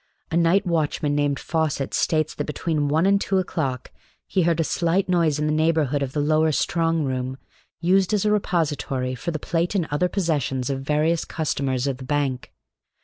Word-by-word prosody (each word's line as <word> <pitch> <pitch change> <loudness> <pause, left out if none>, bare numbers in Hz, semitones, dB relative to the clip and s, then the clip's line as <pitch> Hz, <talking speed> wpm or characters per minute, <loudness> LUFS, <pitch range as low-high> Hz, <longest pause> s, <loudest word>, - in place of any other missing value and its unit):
A - - -1
night 170 +4 +3
watchman 155 -3 0
named 145 -1 0
Fawcett 155 -4 -1
states 155 -1 +1
that - - -3
between 150 -1 -1
one 155 +4 +2
and 200 0 +3
two 195 - 0
o'clock 140 -8 -2 0.3
he 190 - 0
heard 170 -1 +2
a - - +3
slight 170 +4 0
noise 170 -5 +2
in 150 - -1
the 155 - +1
neighborhood 155 -3 +1
of 135 -1 -3
the 150 - -1
lower 155 +2 +2
strong 165 +1 +1
room, 130 -1 -3 0.4
used 185 +2 +3
as 210 -1 +1
a 210 - +3
repository 145 -10 -1
for 130 - -4
the 160 - -2
plate 170 +5 -1
and 175 -5 +1
other 180 +5 +1
possessions 145 -9 -1
of 135 -1 -3
various 155 +4 +1
customers 140 -5 -2
of 135 -2 -1
the 130 - -9
bank. 135 -2 -1
155 Hz, 190 wpm, -23 LUFS, 140-170 Hz, 0.4 s, night